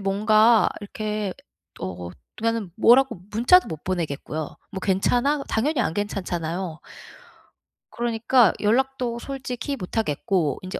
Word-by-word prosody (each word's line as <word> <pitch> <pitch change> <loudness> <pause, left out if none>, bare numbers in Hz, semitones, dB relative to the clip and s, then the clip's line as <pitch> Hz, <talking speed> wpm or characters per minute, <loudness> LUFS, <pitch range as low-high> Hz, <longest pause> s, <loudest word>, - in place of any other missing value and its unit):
뭔가 215 +3 +4
이렇게 210 -1 -4 0.5
어 90 -2 -5 0.3
그니까는 225 -4 -1
뭐라고 245 +3 +5 0.2
문자도 245 +12 +5
못 155 -3 -7
보내겠고요. 160 -3 -3
"뭐 190 -2 -6
괜찮아?" 245 +10 +1
당연히 265 +4 0
안 165 - -1
괜찮잖아요. 175 -4 -3 1.1
그러니까 235 -1 +2
연락도 245 +2 +1
솔직히 265 0 -5
못 185 -4 -7
하겠고 165 -5 0
인제 185 +1 -6
215 Hz, 285 characters per minute, -24 LUFS, 180-240 Hz, 1.1 s, 뭐라고